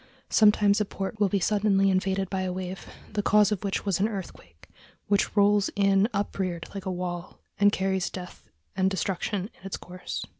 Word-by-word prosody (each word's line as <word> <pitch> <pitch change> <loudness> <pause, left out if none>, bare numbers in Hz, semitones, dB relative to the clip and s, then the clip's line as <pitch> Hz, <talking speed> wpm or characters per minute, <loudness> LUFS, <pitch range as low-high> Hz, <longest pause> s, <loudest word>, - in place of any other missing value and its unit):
Sometimes 210 -1 +5
a - - +1
port 195 +2 -5
will 205 -2 +3
be 200 - +1
suddenly 195 0 +2
invaded 190 +1 0
by 190 0 -2
a 185 -1 -2
wave, 185 +1 -6 0.3
the 210 - 0
cause 210 +1 +4
of 210 -2 -2
which 200 +1 -2
was 195 -3 +1
an 205 - +3
earthquake, 130 - -9 0.4
which 200 +1 +1
rolls 205 0 +4
in 195 +1 +3
upreared 190 -5 -2
like 195 -1 -6
a - - 0
wall, 175 -1 -5 0.2
and 205 0 +6
carries 190 -2 0
death 180 -1 -9 0.3
and 190 0 +2
destruction 195 +2 -2
in - - -24
its 195 - -4
course. 180 0 -6
195 Hz, 185 wpm, -27 LUFS, 185-205 Hz, 0.4 s, and